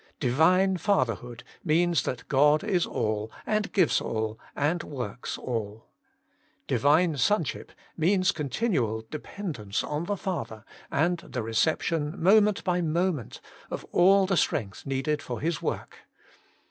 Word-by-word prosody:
Divine 180 Hz, +9 st, +3 dB
Fatherhood 125 Hz, -, -1 dB, 0.2 s
means 170 Hz, 0 st, +2 dB
that 125 Hz, -, -4 dB
God 150 Hz, +3 st, +4 dB
is 190 Hz, -5 st, +1 dB
all, 110 Hz, 0 st, -2 dB
and 215 Hz, 0 st, 0 dB
gives 185 Hz, -6 st, +3 dB
all, 110 Hz, 0 st, -3 dB, 0.2 s
and 160 Hz, +5 st, 0 dB
works 125 Hz, -5 st, -5 dB
all. 110 Hz, -3 st, -4 dB, 0.8 s
Divine 150 Hz, +6 st, +3 dB
Son 205 Hz, +6 st, +3 dB
44 -, -, -4 dB
Working -, -, -12 dB
for -, -, -26 dB
God -, -, -22 dB
ship -, -, -32 dB, 0.2 s
means 185 Hz, +3 st, +3 dB
continual 135 Hz, -, -1 dB
dependence 150 Hz, -, -4 dB
on 150 Hz, +3 st, -3 dB
the 205 Hz, +2 st, -2 dB
Father, 115 Hz, -, -4 dB, 0.2 s
and 170 Hz, +5 st, +1 dB
the 165 Hz, -, -5 dB
reception, 150 Hz, -, 0 dB
moment 210 Hz, +3 st, +4 dB
by 180 Hz, -1 st, +1 dB
mo 170 Hz, +3 st, +1 dB
ment, 140 Hz, -, -7 dB, 0.3 s
of -, -, -5 dB
all 195 Hz, +2 st, +5 dB
the 190 Hz, -1 st, +1 dB
strength 105 Hz, -4 st, -1 dB
needed 135 Hz, +2 st, -1 dB
for 120 Hz, -, -5 dB
His 160 Hz, +1 st, -1 dB
Work. -, -, -4 dB
155 Hz, 145 wpm, -27 LUFS, 125-180 Hz, 0.8 s, all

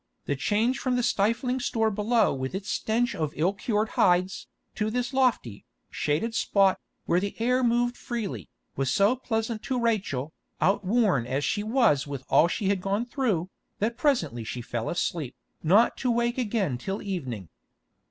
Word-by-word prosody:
The 140 Hz, -, -1 dB
change 220 Hz, -, +1 dB
from 255 Hz, 0 st, 0 dB
the 245 Hz, -, +1 dB
stifling 235 Hz, +5 st, +1 dB
store 225 Hz, -3 st, 0 dB
below 220 Hz, +3 st, +2 dB
with 130 Hz, +4 st, -4 dB
its 195 Hz, +1 st, -4 dB
stench 235 Hz, +2 st, 0 dB
of 155 Hz, -2 st, -2 dB
ill 175 Hz, +6 st, +1 dB
cured 210 Hz, +2 st, -1 dB
hides, 180 Hz, +1 st, +2 dB, 0.3 s
to 210 Hz, 0 st, -1 dB
this 245 Hz, +3 st, -2 dB
lofty, 245 Hz, -, +1 dB, 0.3 s
shaded 160 Hz, +11 st, -1 dB
spot, 195 Hz, -3 st, +3 dB, 0.3 s
where 175 Hz, -, +2 dB
the 200 Hz, +3 st, -4 dB
air 250 Hz, +3 st, +2 dB
moved 240 Hz, 0 st, +2 dB
freely, 200 Hz, -, -5 dB, 0.3 s
was 135 Hz, -1 st, 0 dB
so 200 Hz, -, +3 dB
pleasant 225 Hz, -3 st, -2 dB
to 255 Hz, -2 st, -2 dB
Rachel, 190 Hz, -, -1 dB, 0.3 s
outworn 195 Hz, -, +2 dB
as 135 Hz, +3 st, -1 dB
she 205 Hz, -, 0 dB
was 215 Hz, -, +2 dB
with 140 Hz, -2 st, -5 dB
all 165 Hz, -, +5 dB
she 195 Hz, +3 st, -1 dB
had 200 Hz, -2 st, +1 dB
gone 200 Hz, +5 st, -1 dB
through, 220 Hz, -, -1 dB, 0.3 s
that 225 Hz, +3 st, -1 dB
presently 170 Hz, -, 0 dB
she 120 Hz, -, -5 dB
fell 115 Hz, -1 st, -3 dB
asleep, 165 Hz, -5 st, -2 dB, 0.3 s
not 200 Hz, +9 st, +4 dB
to 255 Hz, -, -1 dB
wake 235 Hz, +1 st, +1 dB
again 205 Hz, -, -1 dB
till 195 Hz, +10 st, -4 dB
evening. 130 Hz, -, -4 dB
205 Hz, 165 wpm, -27 LUFS, 160-235 Hz, 0.3 s, all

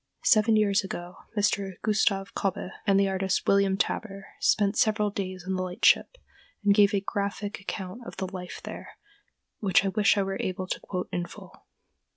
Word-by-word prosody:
Seven 220 Hz, -1 st, +5 dB
years 200 Hz, -2 st, +3 dB
ago 175 Hz, -1 st, -6 dB, 0.2 s
Mr. 200 Hz, -1 st, +1 dB
Gustav 205 Hz, -2 st, +1 dB
Kobbé, 190 Hz, -1 st, -2 dB, 0.2 s
and 195 Hz, -1 st, +5 dB
the 200 Hz, -, +3 dB
artist, 190 Hz, 0 st, 0 dB
William 195 Hz, -1 st, +3 dB
Taber, 195 Hz, -1 st, -3 dB
spent 205 Hz, -1 st, +2 dB
several 210 Hz, -2 st, +2 dB
days 185 Hz, -2 st, -4 dB
on 190 Hz, -, -2 dB
the 185 Hz, -, -1 dB
lightship 185 Hz, -, +2 dB, 0.5 s
and 200 Hz, -, +6 dB
gave 200 Hz, -1 st, +5 dB
a 195 Hz, -, +1 dB
graphic 200 Hz, +1 st, -3 dB
account 195 Hz, +2 st, -6 dB
of -, -, -9 dB
the 190 Hz, -, -2 dB
life 185 Hz, -1 st, -7 dB
there, -, -, -9 dB, 0.6 s
which 195 Hz, -1 st, +3 dB
I -, -, +2 dB
wish 205 Hz, +1 st, +3 dB
I 200 Hz, -, +3 dB
were 195 Hz, 0 st, -3 dB
able 185 Hz, 0 st, -3 dB
to -, -, -3 dB
quote 180 Hz, -2 st, -4 dB
in 175 Hz, -1 st, -2 dB
full. -, -, -14 dB
195 Hz, 180 wpm, -27 LUFS, 190-205 Hz, 0.6 s, and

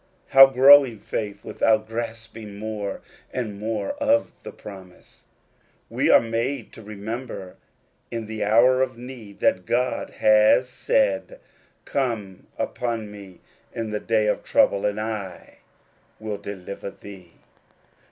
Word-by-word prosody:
How 135 Hz, 0 st, +9 dB
growing 135 Hz, -2 st, +7 dB
faith 100 Hz, 0 st, -5 dB
without 110 Hz, -1 st, +1 dB
grasping 115 Hz, -2 st, -7 dB
more 105 Hz, -2 st, -5 dB, 0.3 s
and 110 Hz, -5 st, -4 dB
more 110 Hz, -, -2 dB
of 285 Hz, 0 st, +2 dB
the -, -, -8 dB
promise? 95 Hz, -3 st, -14 dB, 0.7 s
We -, -, +1 dB
are -, -, +8 dB
made 115 Hz, +2 st, -3 dB
to -, -, -12 dB
remember 105 Hz, -1 st, -7 dB, 0.5 s
in 115 Hz, -1 st, -4 dB
the 110 Hz, 0 st, -4 dB
hour 120 Hz, +5 st, +4 dB
of 130 Hz, -2 st, -1 dB
need, 120 Hz, -5 st, -11 dB
that 90 Hz, -1 st, +1 dB
God 125 Hz, +1 st, 0 dB
has 110 Hz, +4 st, +5 dB
said, -, -, 0 dB, 0.2 s
" -, -, -37 dB
Call 115 Hz, -8 st, -2 dB, 0.2 s
upon 115 Hz, -4 st, -3 dB
me 100 Hz, -3 st, -12 dB, 0.3 s
ift 115 Hz, -2 st, -3 dB
the 105 Hz, -, -2 dB
day 110 Hz, -1 st, +1 dB
of 105 Hz, -, 0 dB
trouble, 100 Hz, +1 st, +2 dB
and 105 Hz, +1 st, -2 dB
I 110 Hz, -4 st, -6 dB, 0.6 s
will 110 Hz, -1 st, -4 dB
deliver 100 Hz, -1 st, -7 dB
thee." 95 Hz, -4 st, -13 dB
110 Hz, 130 wpm, -24 LUFS, 100-125 Hz, 0.7 s, How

